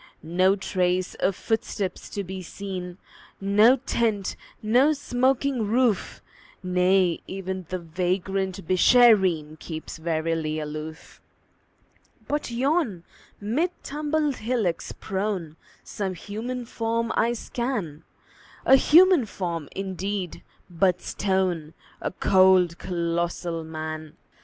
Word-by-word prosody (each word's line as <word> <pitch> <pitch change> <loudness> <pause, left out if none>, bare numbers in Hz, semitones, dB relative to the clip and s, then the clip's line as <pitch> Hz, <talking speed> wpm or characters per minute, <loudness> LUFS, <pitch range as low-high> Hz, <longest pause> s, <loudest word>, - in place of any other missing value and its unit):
No 185 +4 +3
trace 185 -2 0
of 190 0 +1
footsteps 205 -4 -3
to 200 - -4
be 190 0 -6
seen, 180 -1 -6 0.4
No 210 +5 +5
tent, 225 -6 -1 0.3
no 250 +8 +4
smoking 260 -3 0
roof; 235 -1 +1 0.4
Nay, 180 -1 +2
even 190 -2 -5
the 185 - -2
vagrant 185 +2 -2
Beeshareen 185 -6 +4
Keeps 160 0 -7
warily 160 -1 -1
aloof. 155 +1 -7 1.1
But 295 -2 -2
yon, 240 - 0 0.4
mid 245 - 0
tumbled 300 -1 -1
hillocks 220 -7 -1
prone, 190 -5 -3 0.3
Some 190 -3 -4
human 230 +7 -5
form 230 -1 -1
I 235 +1 +2
scan 230 - -4 0.6
A 265 - +8
human 335 - +6
form, 170 -7 -4
indeed, 190 -1 -4 0.3
but 180 +1 +1
stone: 185 -5 -1 0.3
A - - -1
cold, 185 -2 +4
colossal 170 -1 -2
Man! 155 -1 -6
190 Hz, 100 wpm, -25 LUFS, 175-230 Hz, 1.1 s, A